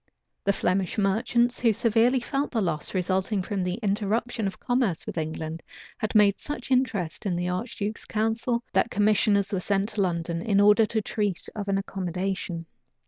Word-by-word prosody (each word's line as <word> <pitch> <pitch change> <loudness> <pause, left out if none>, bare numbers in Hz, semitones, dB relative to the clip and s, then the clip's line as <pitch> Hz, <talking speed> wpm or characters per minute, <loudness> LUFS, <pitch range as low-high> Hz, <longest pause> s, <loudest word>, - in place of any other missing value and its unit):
The 200 - +4
Flemish 185 0 0
merchants, 235 +4 +2
who 230 -3 +4
severely 230 +4 +3
felt 275 +3 -2
the 230 - -1
loss 170 -3 -2
resulting 185 +2 0
from 195 0 -2
the 180 0 -1
interruption 215 +2 0
of 190 - -6
commerce 245 -9 0
with - - -6
England, 160 0 -4 0.4
had 215 - -3
made 205 -2 +5
such 265 -3 -6
interest 215 -10 0
in 180 - 0
the 175 +1 -1
archduke's 210 +2 -3
council, 225 +2 0
that - - +3
commissioners 205 -1 +2
were 190 - +1
sent 200 +2 0
to 210 - -2
London, 170 -2 -1
in 200 +1 +2
order 210 +2 +6
to 220 0 -1
treat 205 -4 -2
of 205 -2 -4
an 195 0 +1
accommodation. 185 -2 -3
200 Hz, 170 wpm, -26 LUFS, 185-225 Hz, 0.4 s, order